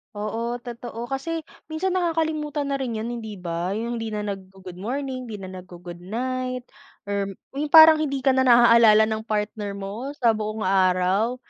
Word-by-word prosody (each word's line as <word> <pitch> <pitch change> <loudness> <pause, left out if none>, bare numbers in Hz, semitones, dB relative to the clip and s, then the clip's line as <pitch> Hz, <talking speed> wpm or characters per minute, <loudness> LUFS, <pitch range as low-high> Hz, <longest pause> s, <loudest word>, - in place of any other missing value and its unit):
Oo 225 +3 -3
totoo, 235 -1 -7
kasi 320 +4 -3 0.2
minsan 325 +4 -2
nakakalimutan 315 -5 -1
na 275 - -1
rin 245 -4 -3
'yon, 225 +2 -3
hindi 220 -2 -7
ba? 175 +1 -3
Yung 235 +2 -3
hindi 225 - -4
na 210 -1 -3
naggo-good 190 -2 -8
morning, 255 +3 -4
hindi 220 - -6
na 190 -2 -8
naggo-good 175 -1 -11
night 255 +5 -3 0.4
or 200 -1 -2 0.2
'yong 295 +2 -1
parang 315 -1 +9
hindi 275 -3 -1
ka 270 - +5
na 260 - +3
naaalala 235 -3 +7
ng 220 0 -3
partner 210 -1 -2
mo 200 +7 -6
sa 240 -5 +3
buong 215 0 -3
araw. 190 +4 +2
225 Hz, 165 wpm, -24 LUFS, 200-265 Hz, 0.4 s, parang